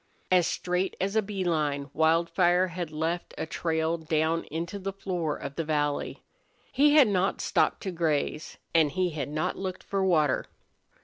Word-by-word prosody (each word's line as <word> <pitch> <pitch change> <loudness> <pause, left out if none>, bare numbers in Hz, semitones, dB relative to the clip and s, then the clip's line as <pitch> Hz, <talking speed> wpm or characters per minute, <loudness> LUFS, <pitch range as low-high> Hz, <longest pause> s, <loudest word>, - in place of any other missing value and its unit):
As 180 -2 +5
straight 180 +1 -1
as 195 +2 -1
a 220 - +4
bee 195 -2 -4
line 150 -4 -1
Wildfire 170 +3 +3
had 175 -1 -4
left 160 +3 -3
a - - -2
trail 160 0 -1
down 160 +1 0
into 170 +6 -5
the 195 +1 -3
floor 180 -5 -3
of 140 - -6
the 165 - 0
valley. 145 -2 -1 0.5
He 290 +2 +4
had 290 -6 +8
not 195 -1 +1
stopped - - +1
to 190 - -2
graze, 160 -2 -1 0.2
and 160 -3 +4
he 180 0 0
had 150 -2 -4
not 155 +1 -2
looked 190 -1 -4
for 195 -1 -1
water. 155 -7 +2
170 Hz, 170 wpm, -28 LUFS, 155-185 Hz, 0.5 s, had